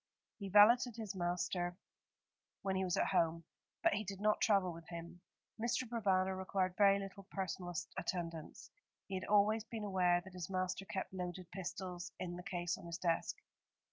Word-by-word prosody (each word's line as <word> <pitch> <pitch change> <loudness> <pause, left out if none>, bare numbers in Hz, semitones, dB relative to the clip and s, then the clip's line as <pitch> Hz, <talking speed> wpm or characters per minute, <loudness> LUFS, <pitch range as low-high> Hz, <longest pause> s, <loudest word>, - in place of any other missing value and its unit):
He 200 -2 -4
valeted 230 +4 +7
his 215 -3 -4
master 175 0 -1 0.9
when 190 -1 0
he 190 - +1
was 180 -2 0
at - - +2
home, 165 0 +2 0.4
but - - +5
he 210 +1 0
did 195 -1 -6
not 210 +1 +2
travel 195 -4 +3
with 165 0 -11
him. 170 +1 -7 0.4
Mr. 240 +2 0
Provana 190 -5 +2
required 185 -1 0
very 200 -1 +6
little 195 0 -7
personal 185 -2 -3 0.3
attendance. 165 -3 -4 0.3
He 195 - -8
had 185 0 -2
always 210 +1 +4
been 225 -1 -6
aware 180 -3 +3
that 190 +1 -12
his 180 -1 -5
master 185 +1 -1
kept 190 0 -4
loaded 180 -1 -5
pistols 180 -1 -5
in 175 -1 -4
the 180 - -6
case 175 -1 -2
on - - -10
his 170 0 -4
desk. 170 -2 0
185 Hz, 170 wpm, -37 LUFS, 175-200 Hz, 0.9 s, valeted